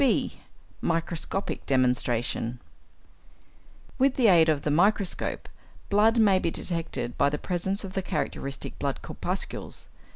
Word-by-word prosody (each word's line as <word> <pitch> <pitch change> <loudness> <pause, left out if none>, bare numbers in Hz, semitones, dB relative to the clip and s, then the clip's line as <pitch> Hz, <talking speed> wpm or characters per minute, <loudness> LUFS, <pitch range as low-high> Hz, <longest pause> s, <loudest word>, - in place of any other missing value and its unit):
(b) 270 - +1 0.4
=Microscopic 165 +3 -1
Demonstration.= 125 -2 +1 1.4
With 270 0 +4
the 240 -5 +5
aid 165 -3 +6
of 150 -2 +1
the 150 - 0
microscope, 195 +4 +1 0.4
blood 215 +3 +4
may 200 -4 +5
be 170 - 0
detected 165 -9 -4
by 140 +2 +5
the 150 - -2
presence 190 +4 -2
of 190 -1 -7
the 190 - 0
characteristic 140 -6 -4
blood - - -2
corpuscles. - - -4
170 Hz, 125 wpm, -27 LUFS, 140-200 Hz, 1.4 s, aid